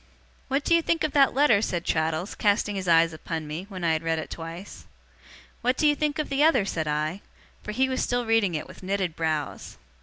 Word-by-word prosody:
'What 275 +2 0
do 335 - +2
you 335 - +5
think 330 -1 0
of 310 - 0
that 275 -3 +4
letter?' 270 -7 +4
said 175 -5 -2
Traddles, 160 +4 -1
casting 205 0 +1
his 190 -2 -4
eyes 165 -1 +4
upon 160 0 -5
me, 155 +6 -6
when 185 -3 -7
I 165 -1 +3
had 160 - -1
read 165 0 -1
it 160 - -6
twice. 165 +4 -8 0.7
'What 250 +2 +1
do - - +1
you 295 - +6
think 300 0 -1
of 305 - -2
the 280 +1 +2
other?' 265 -10 +4
said 160 -5 -2
I. 155 +5 -2 0.4
For 210 - -6
he 260 +5 +1
was 260 0 -1
still 245 -1 0
reading 225 -6 +2
it 155 - -4
with - - -13
knitted 190 -3 -2
brows. 155 -3 -3
195 Hz, 225 wpm, -26 LUFS, 165-260 Hz, 0.7 s, you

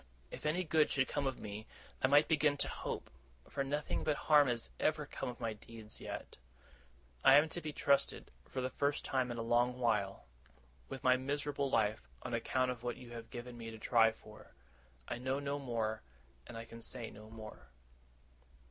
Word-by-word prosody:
If - - -4
any 175 +4 +1
good 160 -2 +3
should 130 -1 +2
come 145 -2 -1
of 130 - -2
me, 105 +1 -6 0.3
I - - +5
might 145 +2 +6
begin 150 -2 +3
to - - +1
hope; - - -4 0.4
for 140 - -1
nothing 145 +2 -1
but 150 - +2
harm 150 -2 +6
has 120 -2 -1
ever 155 -1 +1
come 145 - -4
of 125 - -7
my 115 -1 -1
deeds 110 0 -8
yet. - - -6 0.9
I 135 - +9
am 150 +2 +7
to 175 - -2
be 155 - -3
trusted, 140 -1 +1 0.2
for 130 - -2
the 130 0 -1
first 145 0 0
time 130 -2 +1
in 120 - -3
a 115 - -2
long 120 +2 +3
while, 105 -5 0 0.6
with 135 -2 -6
my 130 0 +6
miserable 140 +1 -1
life, 105 - +1
on - - -4
account 130 -1 +1
of 120 -2 -6
what 120 -1 -3
you 120 -1 -11
have 115 -1 -7
given 120 0 -7
me 115 -1 -5
to 110 - -8
try 115 0 +5
for. 110 -1 -15 0.5
I 120 - -3
know 130 +2 0
no 140 0 -2
more, 115 -5 -1 0.5
and 115 - -7
I 115 - -6
can 115 0 -11
say 115 -1 -4
no 110 +1 -12
more. 110 -1 -10
125 Hz, 195 wpm, -35 LUFS, 115-140 Hz, 0.9 s, I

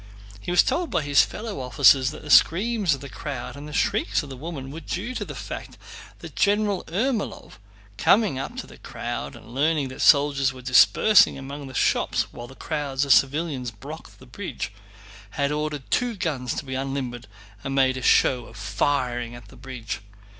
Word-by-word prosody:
He 100 - -8
was 175 - +5
told 345 -1 -1
by 170 -4 0
his 145 -1 +5
fellow 215 -5 -6
officers 130 +1 +5
that 155 - -9
the 150 - -5
screams 200 -2 +4
of 135 - -12
the 140 - -7
crowd 135 -1 -6
and 145 +1 -9
the - - -9
shrieks 145 - 0
of 145 - -10
the - - -6
woman 135 -1 -7
were 160 - -7
due 205 +9 -4
to - - -3
the - - -8
fact - - -7 0.4
that - - -11
General 205 -1 +1
Ermólov, 215 - -2 0.4
coming 205 -11 +3
up 135 - -6
to - - -5
the - - -15
crowd - - -5
and 115 - -13
learning 145 0 +1
that 130 - -8
soldiers 140 -2 +4
were 130 -1 -12
dispersing 135 +12 +5
among 140 +1 -7
the 130 - -10
shops - - +1
while 120 - -8
crowds 145 -3 -2
of 140 - +6
civilians 135 +2 +1
blocked 105 -3 -11
the - - -15
bridge, - - -6 0.6
had 140 0 +1
ordered 150 -1 -2
two 245 -2 +1
guns 135 -10 -2
to - - -4
be 130 - -6
unlimbered 130 -3 -4 0.4
and 135 - -3
made 130 -1 +3
a 130 - -5
show 125 0 +3
of - - -14
firing 120 +4 -1
at 120 -4 -13
the - - -15
bridge. 120 -4 -7
140 Hz, 190 wpm, -24 LUFS, 130-160 Hz, 0.6 s, of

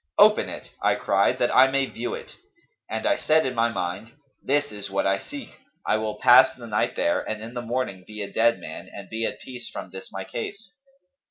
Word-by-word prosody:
'Open - - +6
it,' - - -8
I - - +3
cried, - - +2
'that - - +1
I 130 +1 +8
may 135 0 +1
view 370 - -4
it;' 480 - -10 0.5
and - - -3
I 300 - +3
said 155 +1 +3
in 130 - -1
my 115 -1 +2
mind, 95 +2 -4 0.3
'This 145 +1 +1
is 100 -1 -6
what 95 0 0
I 95 0 +2
seek; 285 -2 -10 0.3
I 110 - +2
will 110 -1 -2
pass 130 +4 +7
the 120 - -10
night 105 -2 0
there - - +1
and 110 - -4
in 115 +2 -8
the 120 - -3
morning 120 -6 -3
be 105 -1 -6
a 100 - -8
dead 115 +1 +4
man - - -8
and 100 -1 -10
be 115 0 -1
at - - -6
peace 125 -2 -8
from - - -7
this 95 0 -9
my 95 - -5
case.' 200 - -6
115 Hz, 225 wpm, -25 LUFS, 105-130 Hz, 0.5 s, I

